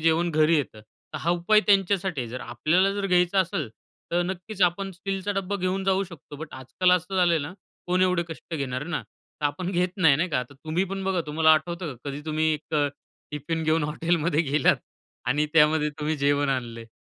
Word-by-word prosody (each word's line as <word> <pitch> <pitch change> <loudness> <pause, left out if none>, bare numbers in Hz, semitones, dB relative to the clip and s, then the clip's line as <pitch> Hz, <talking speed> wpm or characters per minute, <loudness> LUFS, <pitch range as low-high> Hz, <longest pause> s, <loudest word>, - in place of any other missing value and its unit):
जेवण 165 +2 +2
घरी 155 +1 +4
येतं. 125 -6 -3
तर 110 - -12
हा 170 - 0
उपाय 175 +5 +4
त्यांच्यासाठी 195 -5 +2
आहे. 120 - -4
जर 130 +2 -5
आपल्याला 165 +11 +1
जर 200 -1 -2
घ्यायचं 180 +1 +3
असेल, 170 - -4 0.4
तर 175 - +2
नक्कीच 190 +2 -4
आपण 190 +3 +1
स्टीलचा 195 +2 -3
डब्बा 195 0 -2
घेऊन 185 +1 -1
जाऊ 195 0 +2
शकतो. 155 -4 -12
बट 155 +1 -8
आजकाल 130 +8 0
असं 180 +2 -5
झालंय 175 -3 +4
ना, 145 +3 -5 0.3
कोण 180 +1 +2
एवढे 180 -2 +2
कष्ट 160 +1 -8
घेणार 135 -1 -3
ना? 175 -1 -3 0.4
तर - - -3
आपण 180 +5 -3
घेत 180 0 +1
नाही 160 -7 +5
नाही 170 +5 0
का. 125 -4 +1
तर 140 +3 -14
तुम्ही 160 +6 -2
पण 195 -1 -4
बघा, 190 -2 +1
तुम्हाला 160 +1 +4
आठवतं 170 -1 -3
का, 125 +4 -9
कधी 140 +1 -6
तुम्ही 155 0 0
एक 150 +1 -7
अ, 145 -1 +3 0.4
टिफिन 150 +3 -3
घेऊन 155 0 +2
हॉटेलमध्ये 165 +1 0
गेलात 150 +2 +4 0.5
आणि 145 +4 +2
त्यामध्ये 150 -1 +4
तुम्ही 155 +1 -1
जेवण 145 0 +2
आणलंय? 120 -3 -3
165 Hz, 200 wpm, -25 LUFS, 150-185 Hz, 0.5 s, नाही